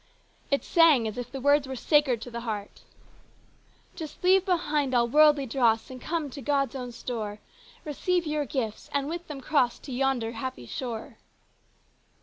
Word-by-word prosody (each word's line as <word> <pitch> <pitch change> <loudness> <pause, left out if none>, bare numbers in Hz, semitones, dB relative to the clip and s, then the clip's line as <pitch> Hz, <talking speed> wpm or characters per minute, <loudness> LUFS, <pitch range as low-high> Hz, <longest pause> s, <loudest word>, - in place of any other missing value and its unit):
It 280 - +1
sang 315 -9 +5
as 215 - -5
if 245 0 -6
the 270 - -5
words 285 +1 +3
were 265 - -5
sacred 270 -3 +2
to 245 - -8
the 235 - -4
heart: 215 -3 -5 1.1
"Just 315 0 -8
leave 375 +1 +5
behind 300 -8 0
all 235 -1 +4
worldly 295 +1 +5
dross 235 -2 +1
and 255 -1 -9
come 315 -2 -2
to 280 - -8
God's 275 +1 0
own 250 -2 -5
store; 220 -4 -5 0.5
Receive 345 +4 0
your 300 -1 -1
gifts 230 -7 -4
and 280 0 +1
with 340 +2 -5
them 285 -3 -7
cross 255 -4 +2
to 275 - -10
yonder 250 -3 0
happy 230 - -6
shore." 230 - -6
270 Hz, 165 wpm, -27 LUFS, 235-300 Hz, 1.1 s, sang